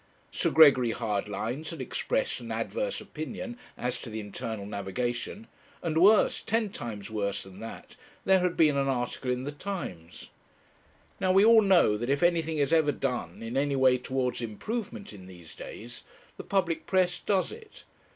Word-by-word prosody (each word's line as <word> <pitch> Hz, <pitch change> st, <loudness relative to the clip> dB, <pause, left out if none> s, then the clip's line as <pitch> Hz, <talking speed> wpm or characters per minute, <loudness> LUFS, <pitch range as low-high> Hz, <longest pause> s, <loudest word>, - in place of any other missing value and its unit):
Sir -, -, 0 dB
Gregory 130 Hz, -7 st, +6 dB
Hardlines 110 Hz, +6 st, -3 dB
had 165 Hz, -, -7 dB
expressed -, -, -1 dB
an -, -, -8 dB
adverse -, -, -2 dB
opinion 200 Hz, -, -6 dB, 0.2 s
as 125 Hz, 0 st, -2 dB
to -, -, -7 dB
the 110 Hz, 0 st, -5 dB
Internal 105 Hz, 0 st, -5 dB
Navigation, 120 Hz, -, -3 dB, 0.4 s
and 165 Hz, -3 st, -1 dB
worse, 210 Hz, +3 st, +5 dB
ten 225 Hz, -1 st, 0 dB
times 110 Hz, -, -6 dB
worse 100 Hz, -2 st, -2 dB
than 95 Hz, 0 st, -13 dB
that, 115 Hz, -, -9 dB, 0.3 s
there 190 Hz, 0 st, +5 dB
had 180 Hz, -1 st, 0 dB
been 155 Hz, -3 st, +5 dB
an 135 Hz, 0 st, +1 dB
article 125 Hz, 0 st, -2 dB
in 125 Hz, 0 st, -1 dB
the 145 Hz, -, -4 dB
Times. 145 Hz, -, -7 dB, 0.9 s
Now, 185 Hz, -1 st, +2 dB
we 195 Hz, +2 st, +6 dB
all 225 Hz, 0 st, +8 dB
know 185 Hz, -, +4 dB
that 120 Hz, +4 st, -3 dB
if 140 Hz, +4 st, +1 dB
anything 165 Hz, -2 st, +2 dB
is 145 Hz, +2 st, +1 dB
ever 160 Hz, -3 st, +4 dB
done 125 Hz, -4 st, -3 dB
in 115 Hz, +2 st, -5 dB
any 140 Hz, +1 st, +1 dB
way 130 Hz, -1 st, +4 dB
towards 125 Hz, 0 st, -2 dB
improvement 200 Hz, -, -5 dB
in 95 Hz, -2 st, -12 dB
these 85 Hz, -4 st, -13 dB
days, 120 Hz, +1 st, -9 dB, 0.3 s
the -, -, -8 dB
public 185 Hz, -4 st, -1 dB
press 185 Hz, -2 st, +2 dB
does 195 Hz, -2 st, 0 dB
it. 440 Hz, -1 st, -12 dB
135 Hz, 170 wpm, -28 LUFS, 115-185 Hz, 0.9 s, all